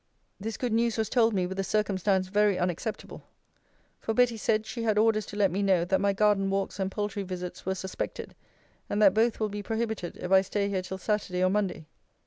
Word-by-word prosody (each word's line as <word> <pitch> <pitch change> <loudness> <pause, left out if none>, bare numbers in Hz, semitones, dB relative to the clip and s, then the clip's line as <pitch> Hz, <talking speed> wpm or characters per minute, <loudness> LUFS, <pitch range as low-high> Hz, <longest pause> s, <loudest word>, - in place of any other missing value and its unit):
This 220 +3 -4
good 245 -3 -2
news 230 0 +1
was 220 -1 0
told 230 -2 +3
me, 185 -2 +1
with 190 +2 -5
a - - +1
circumstance 195 -2 +1
very 205 -1 +3
unacceptable; 180 +5 -3 0.8
for 225 - -3
Betty 245 -1 +4
said, 215 0 0
she 235 - -5
had 220 -2 +1
orders 215 -1 +3
to - - -8
let 200 -2 +3
me 195 +3 -1
know, 190 -4 +3
that 190 +2 +1
my 200 0 +3
garden 195 -1 +2
walks 195 0 -2
and 190 0 0
poultry 205 0 -3
visits 180 -1 -6
were 190 - 0
suspected; 190 0 -5 0.6
and 205 - -1
that 200 -3 +6
both 225 +2 +2
will 215 -1 0
be 205 0 -5
prohibited, 220 -3 -3
if 180 - -6
I 190 0 +7
stay 200 +1 -1
here 190 -2 -1
till 190 +1 -6
Saturday 190 -2 -1
or 185 - +3
Monday. 195 -6 -1
200 Hz, 215 wpm, -28 LUFS, 190-215 Hz, 0.8 s, I